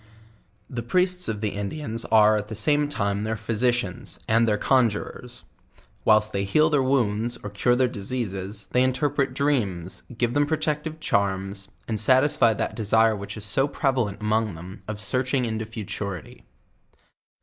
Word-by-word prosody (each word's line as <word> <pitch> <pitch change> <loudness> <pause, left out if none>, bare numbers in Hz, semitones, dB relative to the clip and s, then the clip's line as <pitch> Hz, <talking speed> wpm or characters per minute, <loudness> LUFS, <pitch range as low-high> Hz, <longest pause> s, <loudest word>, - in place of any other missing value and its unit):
The 120 -2 -5
Priests 180 +8 +1
of 105 -2 -3
the 110 - 0
Indians 115 +3 -3
are 110 -1 +5
at 105 -1 -2
the 110 - -6
same 145 +7 +2
time 100 -7 -1
their 110 +1 -2
physicians, 115 -2 -1
and 115 +1 +3
their 105 -1 +2
conjurers; 120 0 0 0.6
whilst 110 0 +4
they 100 - 0
heal 155 +11 +3
their 145 -2 +3
wounds, 120 -3 +1
or 105 - -6
cure 120 +4 +2
their 130 0 +3
diseases, 100 -3 -3
they 125 - +3
interpret 130 0 0
dreams, 105 - -1 0.2
give 120 0 0
them 145 +1 +2
pro 160 - 0
tective 155 +1 -3
charms, 100 -4 -1 0.2
and 110 -2 -2
satisfy 130 -1 +4
that - - -3
desire 110 0 +3
which 100 +1 -7
is 105 - -4
so 135 +7 +2
prevalent 125 -8 -1
among 110 0 0
them 90 +5 -10
of 105 -1 -5
searching 125 +5 0
into 110 -1 -3
futurity. 100 -4 -6
110 Hz, 160 wpm, -25 LUFS, 105-130 Hz, 0.6 s, are